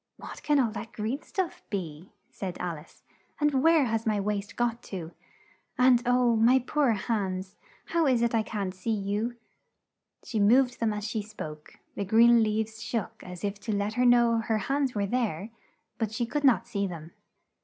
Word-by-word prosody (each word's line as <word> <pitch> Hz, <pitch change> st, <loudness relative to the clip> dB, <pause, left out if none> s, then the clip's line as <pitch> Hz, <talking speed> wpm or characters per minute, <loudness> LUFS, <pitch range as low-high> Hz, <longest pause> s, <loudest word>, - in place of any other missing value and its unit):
"What -, -, -9 dB
can 295 Hz, -1 st, +2 dB
all 235 Hz, -4 st, +2 dB
that 225 Hz, +2 st, -7 dB
green 225 Hz, +7 st, -3 dB
stuff 365 Hz, -2 st, -3 dB
be?" 170 Hz, -4 st, -5 dB, 0.2 s
said 185 Hz, -2 st, -5 dB
Al 170 Hz, -3 st, -4 dB
ice. 150 Hz, -, -19 dB, 0.4 s
"And 295 Hz, -3 st, +2 dB
where 325 Hz, -1 st, +5 dB
has 225 Hz, -1 st, -1 dB
my 215 Hz, -1 st, +2 dB
waist 205 Hz, 0 st, -3 dB
got 240 Hz, -1 st, -1 dB
to? 170 Hz, -4 st, -6 dB, 0.7 s
And 250 Hz, -1 st, +5 dB
oh, 245 Hz, -1 st, +3 dB
my 235 Hz, +4 st, +5 dB
poor 265 Hz, 0 st, +1 dB
hands, 190 Hz, -3 st, -2 dB, 0.3 s
how 335 Hz, -2 st, +1 dB
is 245 Hz, -3 st, +3 dB
it 235 Hz, -, +1 dB
I 225 Hz, -, +3 dB
can't 200 Hz, -4 st, -3 dB
see 185 Hz, +4 st, -6 dB
you?" 210 Hz, +3 st, -1 dB, 0.9 s
She 220 Hz, -, -3 dB
moved 245 Hz, +5 st, +4 dB
them 225 Hz, -2 st, +1 dB
as 210 Hz, -1 st, -4 dB
she 220 Hz, 0 st, -2 dB
spoke; 155 Hz, -8 st, -9 dB, 0.2 s
the 200 Hz, -, -3 dB
green 230 Hz, +4 st, +6 dB
leaves 220 Hz, 0 st, -1 dB
shook 230 Hz, -5 st, -4 dB
as 180 Hz, -1 st, -9 dB
if 200 Hz, 0 st, -2 dB
to 215 Hz, -, -4 dB
let 205 Hz, +1 st, -1 dB
her 250 Hz, +2 st, +1 dB
know 235 Hz, -1 st, +5 dB
her 225 Hz, -1 st, 0 dB
hands 270 Hz, +4 st, -1 dB
were 200 Hz, -1 st, 0 dB
there, 215 Hz, -3 st, -2 dB, 0.5 s
but 220 Hz, -3 st, -1 dB
she 235 Hz, +2 st, -1 dB
could 290 Hz, +5 st, -3 dB
not 265 Hz, -4 st, +4 dB
see 200 Hz, -1 st, -1 dB
them. 165 Hz, -2 st, -8 dB
220 Hz, 185 wpm, -28 LUFS, 200-245 Hz, 0.9 s, green